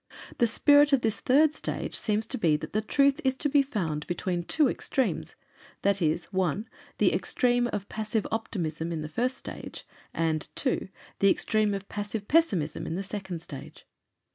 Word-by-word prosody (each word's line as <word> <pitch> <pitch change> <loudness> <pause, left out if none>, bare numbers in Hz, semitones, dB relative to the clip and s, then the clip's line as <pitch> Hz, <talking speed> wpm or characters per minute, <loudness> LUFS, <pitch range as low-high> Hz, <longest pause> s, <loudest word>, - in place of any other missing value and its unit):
The 235 - +5
spirit 285 +5 +5
of 270 - +5
this 220 -3 0
third 295 +6 +4
stage - - -4
seems 215 0 0
to 255 +2 -3
be 160 -6 +3
that - - -8
the 215 - +1
Truth 275 +6 +2
is 265 -1 +2
to 295 +3 0
be 285 0 +4
found 175 - -3
between 175 0 -2
the 175 - -7
two 305 -3 +4
extremes, 260 0 -1 0.5
viz.: 175 -5 +1
(1) 190 +3 0 0.3
the - - +3
extreme 245 -1 +1
of 200 -1 -4
passive 215 0 -2
optimism 170 -7 -2
of 160 -2 -3
the - - -4
first 250 +11 -1
stage; - - -8 0.3
and 160 -2 -1
(2) 260 -7 0 0.3
the 195 - +5
extreme 215 0 +2
of 195 0 -6
passive 205 0 -4
pessimism 195 - +2
of 165 - -3
the 195 - -2
second 190 -4 -5
stage. 140 -3 -10
210 Hz, 175 wpm, -28 LUFS, 175-255 Hz, 0.5 s, The